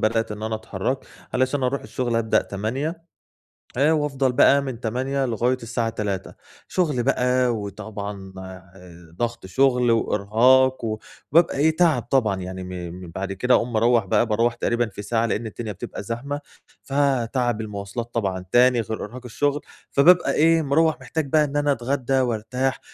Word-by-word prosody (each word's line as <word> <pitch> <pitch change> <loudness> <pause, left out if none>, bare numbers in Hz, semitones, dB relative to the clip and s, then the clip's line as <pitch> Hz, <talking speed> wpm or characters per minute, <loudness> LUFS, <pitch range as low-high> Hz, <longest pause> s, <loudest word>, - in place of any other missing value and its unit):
بدأت 110 0 0
إن 105 +1 -8
أنا 110 0 -2
أتحرّك 110 +4 -3 0.4
علشان 130 +2 +1
أروح 130 +2 0
الشُغل 120 -2 -2
أبدأ 110 -1 +2
08:00 140 - -4 0.7
آآ 145 +4 +4
وأفضل 140 -4 +1
بقى 140 +2 +5
من 130 -4 -5
08:00 130 +4 -1
لغاية 125 +1 0
الساعة 115 0 -1
15:00. 100 -4 -4 0.3
شُغل 150 -10 0
بقى 125 -1 +2
وطبعًا 100 -2 -6
آآ 90 -2 -13
ضَغَط 120 -4 -3
شُغل 125 +4 +2
وإرهاق، 115 +4 +3 0.5
وبابقى 165 0 +4
إيه، 155 +3 +3
تَعَب 160 -7 +3
طبعًا 115 -6 +1
يعني 95 0 -6 0.3
م 90 -1 -9
بعد 95 0 -3
كده 125 +6 +1
أقوم 120 0 0
مروّح 115 0 +3
بقى 95 - +2
باروح 115 +2 +1
تقريبًا 120 0 0
في 100 - -8
ساعة، 115 +2 0
لإن 115 0 -2
الدنيا 110 0 -6
بتبقى 100 - -7
زحمة. 135 +7 -4 0.4
فتَعَب 125 -4 0
المواصلات 105 +3 -6
طبعًا 95 -5 -2
تاني 125 0 +5
غير 110 0 -5
إرهاق 120 +5 -10
الشُغل، 145 +4 -1 0.3
فبابقى 175 +6 +5
إيه، 165 +1 +4
مروّح 155 +2 +2
محتاج 160 -2 -2
بقى 155 +2 +4
إن 145 -1 -4
أنا 145 0 +2
أتغدّى 135 +1 0
وأرتاح 125 +2 -1
120 Hz, 155 wpm, -23 LUFS, 110-135 Hz, 0.7 s, بقى